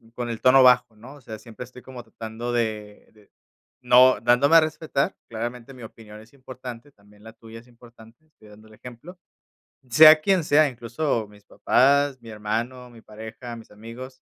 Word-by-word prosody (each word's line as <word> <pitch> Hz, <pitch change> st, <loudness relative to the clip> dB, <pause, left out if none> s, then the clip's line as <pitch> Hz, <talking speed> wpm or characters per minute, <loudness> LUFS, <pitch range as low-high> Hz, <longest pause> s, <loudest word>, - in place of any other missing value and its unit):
con 120 Hz, -1 st, -5 dB
el 115 Hz, -, -6 dB
tono 130 Hz, +1 st, +5 dB
bajo, 125 Hz, -3 st, +3 dB
¿no? 125 Hz, +7 st, -14 dB
O 140 Hz, -, -18 dB
sea, 110 Hz, -3 st, -10 dB
siempre 115 Hz, +1 st, -11 dB
estoy 125 Hz, 0 st, -16 dB
como 125 Hz, -2 st, -11 dB
tratando 115 Hz, +1 st, -8 dB
de 110 Hz, -3 st, -5 dB
de, 105 Hz, -2 st, -25 dB, 0.5 s
no 125 Hz, -2 st, +5 dB
dándome 125 Hz, +7 st, +3 dB
a -, -, +8 dB
respetar. 155 Hz, -2 st, -3 dB
Claramente 120 Hz, +3 st, -7 dB
mi 125 Hz, -, -13 dB
opinión 110 Hz, -1 st, -13 dB
es 110 Hz, +4 st, -19 dB
importante, 130 Hz, 0 st, -11 dB
también 105 Hz, -1 st, -24 dB
la 110 Hz, -, -13 dB
tuya 115 Hz, 0 st, -14 dB
es 120 Hz, -, -21 dB
importante, 120 Hz, +3 st, -20 dB
estoy 110 Hz, -9 st, -22 dB
dando 110 Hz, +1 st, -18 dB
el 110 Hz, -, -19 dB
ejemplo, 125 Hz, +11 st, -13 dB, 0.7 s
sea 155 Hz, +5 st, +7 dB
quien 190 Hz, 0 st, +1 dB
sea, 150 Hz, 0 st, +3 dB
incluso 120 Hz, -1 st, -4 dB
mis 105 Hz, -1 st, -20 dB
papás, 140 Hz, +5 st, +1 dB
mi 115 Hz, -, -15 dB
hermano, 115 Hz, +4 st, -5 dB
mi 115 Hz, -2 st, -17 dB
pareja, 110 Hz, +3 st, -11 dB
mis 115 Hz, -, -15 dB
amigos, 120 Hz, +5 st, -12 dB
120 Hz, 180 wpm, -23 LUFS, 110-130 Hz, 0.7 s, a